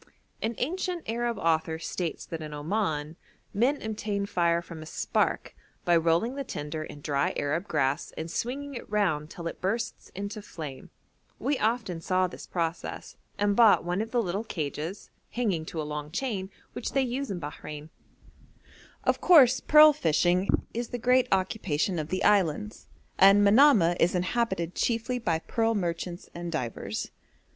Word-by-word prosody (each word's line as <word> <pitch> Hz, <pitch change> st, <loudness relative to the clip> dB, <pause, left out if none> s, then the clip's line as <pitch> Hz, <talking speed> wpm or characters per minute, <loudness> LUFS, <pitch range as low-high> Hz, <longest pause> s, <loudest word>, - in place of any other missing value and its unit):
An 225 Hz, +1 st, -1 dB
ancient 355 Hz, +4 st, -2 dB
Arab 235 Hz, 0 st, -1 dB
author 160 Hz, -2 st, +1 dB
states 165 Hz, 0 st, -4 dB
that 165 Hz, -1 st, -6 dB
in 150 Hz, -1 st, -6 dB
Oman 155 Hz, -2 st, -2 dB, 0.4 s
'men 250 Hz, +8 st, +2 dB
obtain 210 Hz, -2 st, -2 dB
fire 170 Hz, -3 st, +2 dB
from 170 Hz, -2 st, -9 dB
a -, -, -8 dB
spark, -, -, -1 dB, 0.3 s
by 175 Hz, -, +4 dB
rolling 165 Hz, +8 st, +2 dB
the 275 Hz, 0 st, -4 dB
tinder 150 Hz, -, -5 dB
in 145 Hz, -1 st, -10 dB
dry 140 Hz, -1 st, 0 dB
Arab 160 Hz, +7 st, -1 dB
grass 140 Hz, -2 st, 0 dB
and 160 Hz, +1 st, -5 dB
swinging 280 Hz, +7 st, -3 dB
it 240 Hz, -, -8 dB
round 175 Hz, -8 st, 0 dB
till 170 Hz, -, -9 dB
it 165 Hz, -, -5 dB
bursts 225 Hz, +5 st, -2 dB
into 200 Hz, +3 st, -5 dB
flame.' 150 Hz, -9 st, -8 dB, 0.5 s
We 285 Hz, -1 st, -1 dB
often 215 Hz, -7 st, -1 dB
saw 185 Hz, +2 st, +2 dB
this 180 Hz, -, -8 dB
process 165 Hz, -1 st, -4 dB, 0.2 s
and 205 Hz, 0 st, +2 dB
bought 230 Hz, -2 st, +6 dB
one 175 Hz, +3 st, -1 dB
of 225 Hz, -, -4 dB
the 240 Hz, 0 st, +1 dB
little 195 Hz, +3 st, -2 dB
cages, 160 Hz, -1 st, -5 dB, 0.2 s
hanging 205 Hz, -9 st, -1 dB
to 160 Hz, -, -6 dB
a -, -, -1 dB
long 150 Hz, 0 st, -5 dB
chain, 195 Hz, -, -3 dB, 0.2 s
which -, -, -4 dB
they 270 Hz, -, +3 dB
use 260 Hz, +2 st, -3 dB
in 190 Hz, -3 st, -3 dB
Bahrein. 150 Hz, 0 st, -7 dB, 1.1 s
Of -, -, +1 dB
course 265 Hz, -8 st, +7 dB
pearl 305 Hz, 0 st, +7 dB
fishing 175 Hz, -, +2 dB, 0.3 s
is 235 Hz, +1 st, -3 dB
the 245 Hz, -, -4 dB
great 250 Hz, +2 st, +3 dB
occupation 185 Hz, -3 st, 0 dB
of 150 Hz, -, -3 dB
the 185 Hz, +2 st, -1 dB
islands, 205 Hz, +1 st, +1 dB, 0.3 s
and 195 Hz, +2 st, +7 dB
Manamah 200 Hz, -, +6 dB
is 175 Hz, +2 st, +3 dB
inhabited 185 Hz, -2 st, -1 dB
chiefly 235 Hz, +1 st, 0 dB
by 170 Hz, -8 st, 0 dB
pearl 225 Hz, +6 st, 0 dB
merchants 175 Hz, -2 st, -3 dB
and 175 Hz, 0 st, -5 dB
divers. 125 Hz, -8 st, -4 dB
185 Hz, 160 wpm, -28 LUFS, 165-230 Hz, 1.1 s, course